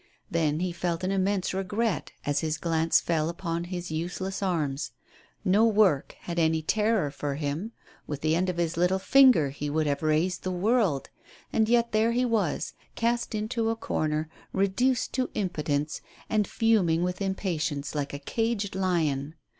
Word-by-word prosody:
Then 160 -1 +1
he 185 -1 0
felt 170 0 -2
an 185 - 0
immense 195 -1 0
regret 200 +3 -1
as 145 0 +1
his 160 0 -1
glance 165 -1 +2
fell 160 -2 0
upon 170 -1 -3
his 175 -1 -5
use 170 +3 -3
less 190 +1 -3
arms. 150 - -1 0.5
No 200 +3 +4
work 205 -10 +3
had 170 -1 -3
any 160 -1 +2
terror 210 -4 +1
for 140 0 -3
him. 150 +9 -3 0.4
With 145 -1 -4
the 155 0 +2
end 185 +2 +1
of 180 - -3
his 170 -1 -1
little 180 +2 +3
finger 245 - +5
he 145 +1 -4
would 155 +1 +1
have 140 -1 0
raised 155 +4 +1
the 185 - -3
world; 185 - +1 0.4
and 220 0 +2
yet 235 0 +3
there 220 +2 +2
he 250 +1 +2
was, 230 -3 0 0.2
cast 235 0 0
into 225 +1 -1
a 225 - 0
corner, 155 -8 -1 0.3
reduced 215 +7 +1
to 255 -1 0
impotence, 150 -6 -1 0.3
and 215 -2 +2
fuming 190 -8 +2
with 180 +2 -2
impatience 170 -7 -2
like 145 -2 -2
a 140 - -4
caged 215 +6 -1
lion! 160 -6 0
180 Hz, 170 wpm, -27 LUFS, 155-210 Hz, 0.5 s, finger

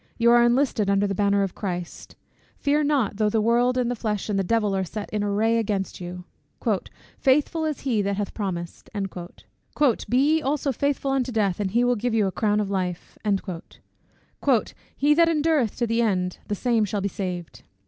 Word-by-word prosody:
You 235 0 +4
are 240 0 +6
enlisted 240 -3 +2
under 200 0 +3
the 200 - -1
banner 200 0 +2
of 195 - -3
Christ 180 -4 -6 0.4
Fear 295 +1 +1
not, 265 -9 +1
though 215 -1 +2
the 220 - +1
world, 240 +3 +2
and 245 -1 +1
the - - -1
flesh, 215 -3 -3
and 200 -2 +1
the - - +1
devil 210 0 +1
are 190 - 0
set 205 +3 -6
in 210 -1 -1
array 220 +3 +2
against 200 -4 -2
you. 180 0 -7 1.0
"Faithful 300 +4 +2
is 305 -2 -3
he 240 -6 +1
that 200 0 -1
hath 205 -1 -3
promised;" 175 -5 -5 1.2
"be 245 - +2
ye 305 +4 +3
also 280 0 0
faithful 280 +1 -1
unto 260 -2 0
death, 205 -5 0
and 200 -2 0
he 235 +5 +2
will 245 0 +3
give 235 +1 -1
you 215 -2 +3
a 190 - 0
crown 210 +1 +1
of 200 -2 -2
life." 180 -3 -3 1.8
"He 290 +1 +4
that 335 +2 +4
endureth 305 -7 +1
to 240 - 0
the 230 +1 +1
end, 180 -5 0
the 205 - -1
same 230 +1 +1
shall 205 0 -2
be 200 - 0
saved." 180 -4 -5
215 Hz, 190 wpm, -24 LUFS, 200-250 Hz, 1.8 s, are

